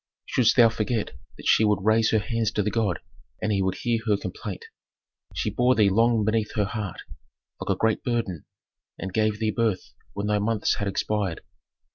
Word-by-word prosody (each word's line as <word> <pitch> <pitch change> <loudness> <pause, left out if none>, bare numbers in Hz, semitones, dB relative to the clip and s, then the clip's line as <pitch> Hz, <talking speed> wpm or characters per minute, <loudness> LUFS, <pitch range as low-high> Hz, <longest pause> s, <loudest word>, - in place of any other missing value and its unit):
"Shouldst 125 - +3
thou 120 -2 +7
forget 115 0 -2 0.3
that - - -11
she - - +5
would 105 -3 +2
raise 110 +1 +4
her 110 - +3
hands 110 +1 0
to 105 - +1
the 105 - -1
god, 105 -6 0 0.4
and 110 - -1
he 100 -2 +1
would 95 0 0
hear 115 +3 0
her 105 -2 +3
complaint. 95 0 -6 0.7
She - - -1
bore 125 +1 +3
thee 105 -3 +4
long 115 +1 +3
beneath 110 0 0
her 105 -2 +2
heart, 105 -2 -5 0.6
like - - -6
a 95 - +1
great 110 +1 +1
burden, 115 - -2 0.5
and 95 -1 -6
gave 110 0 +1
thee 110 0 0
birth 110 -4 -1 0.2
when 100 - -3
thy 105 0 +1
months 105 0 0
had 100 - -2
expired. 100 -2 -1
105 Hz, 190 wpm, -25 LUFS, 100-115 Hz, 0.7 s, thou